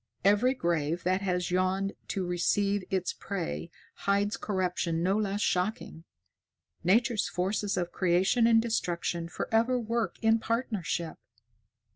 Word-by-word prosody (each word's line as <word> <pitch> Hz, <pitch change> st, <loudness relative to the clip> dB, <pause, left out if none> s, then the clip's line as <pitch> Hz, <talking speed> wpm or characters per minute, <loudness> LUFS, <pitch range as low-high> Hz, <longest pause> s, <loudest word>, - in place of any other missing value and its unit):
Every 215 Hz, +6 st, +4 dB
grave 170 Hz, -, -1 dB
that 185 Hz, +2 st, +1 dB
has 180 Hz, -2 st, -1 dB
yawned 185 Hz, +2 st, +1 dB
to 190 Hz, -2 st, -2 dB
receive 195 Hz, +3 st, +1 dB
its 185 Hz, -2 st, -1 dB
prey 180 Hz, -3 st, -4 dB, 0.2 s
hides 200 Hz, +1 st, 0 dB
corruption 180 Hz, -4 st, -1 dB
no 190 Hz, +2 st, +2 dB
less 205 Hz, -1 st, -1 dB
shocking. 180 Hz, -4 st, -1 dB, 0.8 s
Nature's 225 Hz, +5 st, +2 dB
forces 195 Hz, +3 st, -1 dB
of 175 Hz, -1 st, -1 dB
creation 190 Hz, +6 st, +3 dB
and 225 Hz, -1 st, +6 dB
destruction 175 Hz, -6 st, -1 dB
forever 230 Hz, +7 st, +1 dB
work 230 Hz, -4 st, -1 dB
in 225 Hz, 0 st, +4 dB
partnership. 215 Hz, -9 st, -2 dB
195 Hz, 120 wpm, -29 LUFS, 175-220 Hz, 0.8 s, and